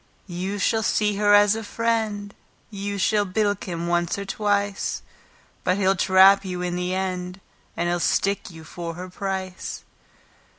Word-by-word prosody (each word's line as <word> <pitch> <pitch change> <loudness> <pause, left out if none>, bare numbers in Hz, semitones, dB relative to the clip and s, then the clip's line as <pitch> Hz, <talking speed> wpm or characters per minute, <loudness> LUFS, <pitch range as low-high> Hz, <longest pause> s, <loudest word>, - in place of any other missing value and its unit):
You 185 +2 -4
shall 220 +2 +1
see 210 -1 +1
her 205 0 +5
as 205 0 +5
a 225 - -4
friend, 220 -2 -1 0.4
You 200 0 -4
shall 205 +2 +2
bilk 205 +1 -1
him 170 -3 -4
once 175 +1 0
and 200 0 -5
twice; 205 0 -1 0.6
But 185 +1 +1
he'll 195 -1 +3
trap 190 +1 +6
you 180 -2 -4
in 175 0 -2
the 180 +1 -2
end, 185 -1 -3 0.4
And 170 - 0
he'll 175 0 0
stick 195 +3 0
you 165 -2 -12
for 170 +1 -6
her 180 +2 -7
price. 190 -1 -5
195 Hz, 160 wpm, -24 LUFS, 180-205 Hz, 0.6 s, trap